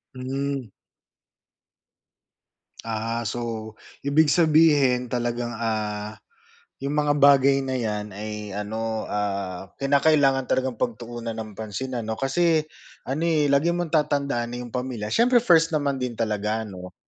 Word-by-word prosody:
Hmm. 135 -2 -3 2.1
Ah, 115 +1 -3
so, 110 -2 -4 0.3
ibig 145 +2 +3
sabihin 150 -7 +4
talagang 120 -1 -2
ah, 110 -2 -3 0.6
’yong 140 +2 -3
mga 150 -1 +2
bagay 140 -1 +6
na 130 0 -2
’yan 105 -4 -3
ay 105 -1 -6
ano, 110 +2 -3
ah, 100 -2 -3
kinakailangan 140 -1 +3
talagang 130 -3 0
pagtuunan 120 0 -4
ng 110 -1 -6
pansin 110 +5 -5
ano, 110 -1 -3
kasi 155 +6 +2 0.4
ano 135 +5 -3
eh, 155 -4 +2
lagi 150 +5 +3
mong 175 -2 -3
tatandaan 140 -6 0
na - - -4
’yong 120 -2 -9
pamilya 125 -4 -3
siyempre 240 +1 +4
first 165 -6 +4
naman 140 -3 0
din 125 -2 -3
talaga, 110 -1 -1
’no? 90 -3 -9
125 Hz, 125 wpm, -24 LUFS, 110-140 Hz, 2.1 s, bagay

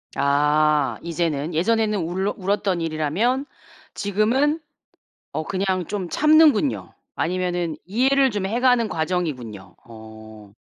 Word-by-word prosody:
아 150 +1 +2
이제는 165 -2 -2
예전에는 215 +5 +1
울러 185 +4 -2
울었던 195 -2 -1
일이라면 165 - 0 0.5
지금은 235 +10 +1 0.7
어 - - -3
그냥 185 0 -1
좀 190 -4 -4
참는군요. 305 - +3 0.2
아니면은 175 -2 -2
이해를 265 +7 +2
좀 205 -2 -2
해가는 240 +2 +2
과정이군요. 130 - -4
어. 110 -2 -13
180 Hz, 255 characters per minute, -22 LUFS, 150-215 Hz, 0.7 s, 참는군요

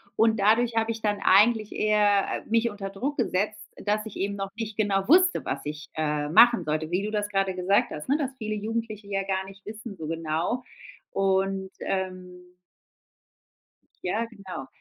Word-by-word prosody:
Und 225 -1 +3
dadurch 225 +3 +3
hab 225 0 +1
ich 225 -1 -3
dann 205 -1 0
eigentlich 215 +2 +5
eher, 210 -2 +3 0.2
äh, - - -18
mich 230 +1 +3
unter 195 -1 -6
Druck 265 +10 -3
gesetzt, 210 -2 0 0.2
dass 210 +1 -1
ich 220 - -8
eben 200 +1 -1
noch 195 -1 -4
nicht 220 -2 -4
genau 195 -3 +1
wusste, 360 +5 +5
was - - -2
ich, 150 0 -6
äh, 150 -1 -1
machen 230 +2 +6
sollte, 155 0 -2
wie 180 +3 0
du 215 - -3
das 210 -1 -1
gerade 195 -2 0
gesagt 185 +2 +2
hast, 150 - -6
ne, 285 - +4
dass 280 -4 -2
viele 215 -2 -3
Jugendliche 215 -1 -4
ja 195 -1 -1
gar 190 0 -1
nicht 195 0 -13
wissen 215 0 -8
so 160 -2 -6
genau. 165 +9 -2 0.5
Und, 195 0 0
ähm 185 -1 -4 1.6
Ja, 215 +6 0
genau. 190 - -8
200 Hz, 180 wpm, -26 LUFS, 190-220 Hz, 1.6 s, machen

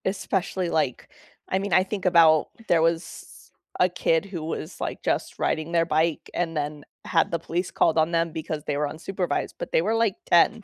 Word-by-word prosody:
Especially, 190 -1 -1
like, 155 -7 -1 0.4
I 190 - +1
mean, 200 -1 -3
I 185 - +6
think 195 0 -5
about 165 -3 +5 0.2
there 170 -2 +4
was 165 +1 -3 0.3
a 180 - +5
kid 165 -1 +1
who 180 -5 -6
was 160 +1 -5
like - - -4
just - - -2
riding 155 +1 -1
their 165 -1 +3
bike 160 0 0
and 165 -2 -2
then 150 0 -3 0.2
had 165 -3 +2
the 170 - 0
police 175 +3 -3
called 165 -1 +2
on 160 +1 +3
them 165 -1 +1
because 155 -1 -5
they 145 - -1
were 150 0 0
unsupervised, 175 +5 -3
but - - -5
they - - +3
were 215 +6 0
like 225 -4 +2
10. 175 +5 +4
165 Hz, 200 wpm, -25 LUFS, 160-185 Hz, 0.4 s, I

